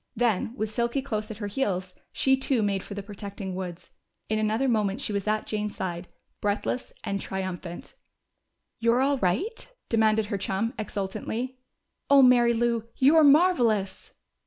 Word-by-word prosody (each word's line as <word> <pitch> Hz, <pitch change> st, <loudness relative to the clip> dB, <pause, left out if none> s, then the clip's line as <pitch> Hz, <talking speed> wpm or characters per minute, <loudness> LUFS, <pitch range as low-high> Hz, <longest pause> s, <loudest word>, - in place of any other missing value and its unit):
Then, 230 Hz, -1 st, 0 dB
with 215 Hz, -3 st, -3 dB
Silky 235 Hz, +4 st, 0 dB
close 215 Hz, -5 st, -3 dB
at 220 Hz, -, -7 dB
her 215 Hz, -, -5 dB
heels, 195 Hz, -5 st, -2 dB, 0.2 s
she 265 Hz, 0 st, +3 dB
too 265 Hz, -3 st, +1 dB
made 200 Hz, -2 st, 0 dB
for 200 Hz, -, -8 dB
the 200 Hz, -, -5 dB
protecting 200 Hz, -1 st, -7 dB
woods. 180 Hz, -2 st, -6 dB, 0.4 s
In 215 Hz, 0 st, +1 dB
another 220 Hz, +5 st, +1 dB
moment 210 Hz, -3 st, +1 dB
she 230 Hz, -6 st, -3 dB
was 200 Hz, 0 st, -2 dB
at 215 Hz, 0 st, 0 dB
Jane's 210 Hz, -1 st, -3 dB
side, 175 Hz, -1 st, -4 dB, 0.3 s
breathless 205 Hz, +4 st, -1 dB
and 200 Hz, -1 st, -2 dB
triumphant. 185 Hz, -2 st, -5 dB, 0.9 s
"You're 235 Hz, +2 st, +3 dB
all 275 Hz, 0 st, +2 dB
right?" 250 Hz, -, -1 dB, 0.2 s
demanded 220 Hz, -1 st, +3 dB
her 200 Hz, -, -1 dB
chum 195 Hz, +4 st, -1 dB
exultantly. 220 Hz, +5 st, -4 dB, 0.5 s
"Oh, 280 Hz, -1 st, +7 dB
Mary 240 Hz, -2 st, +5 dB
Lou, 230 Hz, -1 st, 0 dB
you're 305 Hz, +4 st, +5 dB
marvelous!" 250 Hz, -, +3 dB
215 Hz, 155 wpm, -27 LUFS, 200-245 Hz, 0.9 s, Oh